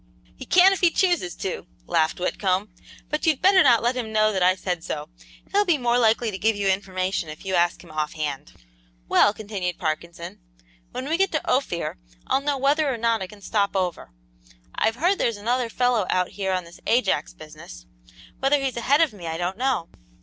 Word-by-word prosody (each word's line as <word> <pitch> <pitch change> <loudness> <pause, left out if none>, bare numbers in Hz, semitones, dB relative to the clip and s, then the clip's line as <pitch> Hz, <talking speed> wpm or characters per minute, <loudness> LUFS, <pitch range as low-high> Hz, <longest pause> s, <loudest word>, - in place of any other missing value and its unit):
"He - - -9
can 370 +2 +6
if 390 - -4
he 350 - +6
chooses 345 - 0
to," 185 -2 -5 0.2
laughed 165 -1 +1
Whitcomb, 185 +1 -1 0.4
"but 305 +2 -1
you'd 310 -4 +3
better 380 0 +5
not 240 -7 +5
let 240 +2 +1
him 235 -3 -4
know 215 0 +3
that 190 - -1
I 185 +1 +4
said 180 -3 -3
so. 150 -1 -5 0.4
He'll 410 +1 +3
be 350 -6 +2
more 245 -2 +1
likely 225 0 +2
to 190 - -6
give 220 +2 +2
you 200 -1 -1
information 190 -3 -1
if 155 +5 -10
you 190 - -3
ask 175 -1 +1
him - - -14
offhand." 150 - -4 0.5
"Well," 205 - +5
continued 200 -4 -4
Parkinson, 170 +1 -4 0.5
"when 260 - -5
we 320 +2 0
get 390 +1 +2
to 310 - -2
Ophir, 175 - -1 0.3
I'll 270 - +1
know 285 0 -1
whether 285 +2 +2
or 245 - -3
not 230 -1 +1
I 190 - -4
can 205 +2 -15
stop 200 0 0
over. 180 - -2 0.6
I've 225 +1 0
heard 355 +9 +1
there's 230 -3 0
another 240 +3 -1
fellow 245 -4 +1
out 180 -1 +1
here 195 -2 -3
on 185 -1 -1
this 170 0 -15
Ajax 200 - +1
business; - - -12 0.5
whether 275 +2 +3
he's 265 -3 -2
ahead 280 +6 +3
of 320 -8 +2
me 180 -5 -9
I 160 0 -3
don't 175 +2 -2
know. 255 -7 -1
210 Hz, 200 wpm, -24 LUFS, 180-260 Hz, 0.6 s, can